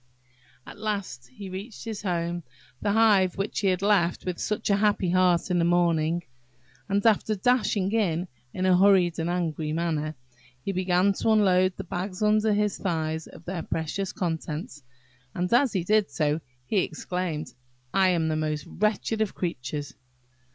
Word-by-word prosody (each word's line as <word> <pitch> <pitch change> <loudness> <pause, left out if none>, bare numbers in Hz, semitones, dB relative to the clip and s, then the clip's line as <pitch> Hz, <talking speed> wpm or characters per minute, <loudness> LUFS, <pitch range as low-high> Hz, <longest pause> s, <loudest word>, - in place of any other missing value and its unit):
At - - -11
last 200 - -3
he 160 +11 -10
reached 195 +6 -8
his 220 -2 -5
home–the 170 -4 -4
hive 205 -5 +4
which 195 +2 -2
he 200 - +1
had 185 0 +1
left 190 -4 +2
with 180 -2 -3
such 210 -1 -1
a 200 - +4
happy 205 -4 +2
heart 180 -1 +3
in 175 - +2
the - - +3
morning–and, 155 - -1
after 215 -1 +3
dashing 210 -3 +1
in, 185 -6 0 0.2
in 185 +6 -2
a 185 -1 +5
hurried 185 -3 +4
and 165 +1 -1
angry 160 -3 -1
manner, 155 -2 -1 0.5
he - - 0
began 185 +1 +2
to 225 - -1
unload 185 -4 +3
the 195 - -4
bags 185 +2 -4
under 215 +1 +3
his 210 -1 0
thighs 160 -3 -2
of 165 - -14
their 180 -1 -3
precious 165 +5 -3
contents, 160 - -4 0.5
and 180 +4 -1
as 250 0 +4
he 185 -4 0
did 210 +2 +2
so 150 0 0 0.2
he 200 - +1
exclaimed, 175 -2 -3 0.4
"I 190 -1 +4
am 170 -3 +1
the 155 - 0
most 155 -1 -2
wretched 215 +2 -1
of 215 - -1
creatures!" 145 -4 -4
180 Hz, 160 wpm, -26 LUFS, 160-200 Hz, 0.5 s, a